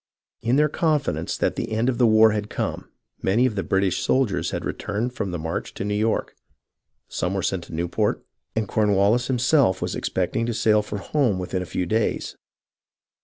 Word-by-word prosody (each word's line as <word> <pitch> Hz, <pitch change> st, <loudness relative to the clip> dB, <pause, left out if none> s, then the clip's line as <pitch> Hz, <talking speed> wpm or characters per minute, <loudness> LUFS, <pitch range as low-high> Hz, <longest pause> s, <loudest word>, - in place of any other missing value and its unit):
In 120 Hz, +3 st, +1 dB
their 150 Hz, +2 st, +4 dB
confidence 150 Hz, -1 st, 0 dB
that -, -, 0 dB
the -, -, -4 dB
end 110 Hz, +2 st, +1 dB
of 130 Hz, -1 st, 0 dB
the 120 Hz, -, +5 dB
war 110 Hz, 0 st, +6 dB
had 105 Hz, 0 st, -3 dB
come, -, -, -4 dB, 0.3 s
many 115 Hz, +7 st, +3 dB
of 125 Hz, -, +1 dB
the 100 Hz, -, -1 dB
British 95 Hz, +1 st, 0 dB
soldiers 130 Hz, -7 st, +1 dB
had -, -, -4 dB
returned 110 Hz, +5 st, -3 dB
from 100 Hz, -, -3 dB
the 90 Hz, -, -3 dB
march 80 Hz, +1 st, -4 dB
to -, -, -4 dB
New 105 Hz, -, -1 dB
York. 110 Hz, +2 st, 0 dB, 0.7 s
Some 90 Hz, +2 st, -2 dB
were 95 Hz, -, -1 dB
sent 90 Hz, -3 st, -1 dB
to -, -, -8 dB
Newport, 85 Hz, +6 st, -1 dB, 0.3 s
and 110 Hz, -2 st, 0 dB
Cornwallis 105 Hz, +4 st, +2 dB
him 130 Hz, -, +1 dB
self 125 Hz, -6 st, +3 dB
was -, -, -2 dB
expecting 115 Hz, 0 st, -1 dB
to 120 Hz, -, -2 dB
sail 105 Hz, -1 st, +3 dB
for 105 Hz, 0 st, -5 dB
home 120 Hz, 0 st, 0 dB
within 90 Hz, 0 st, -3 dB
a 90 Hz, -, -5 dB
few 90 Hz, +3 st, -2 dB
days. 110 Hz, +5 st, -1 dB
110 Hz, 195 wpm, -24 LUFS, 95-120 Hz, 0.7 s, war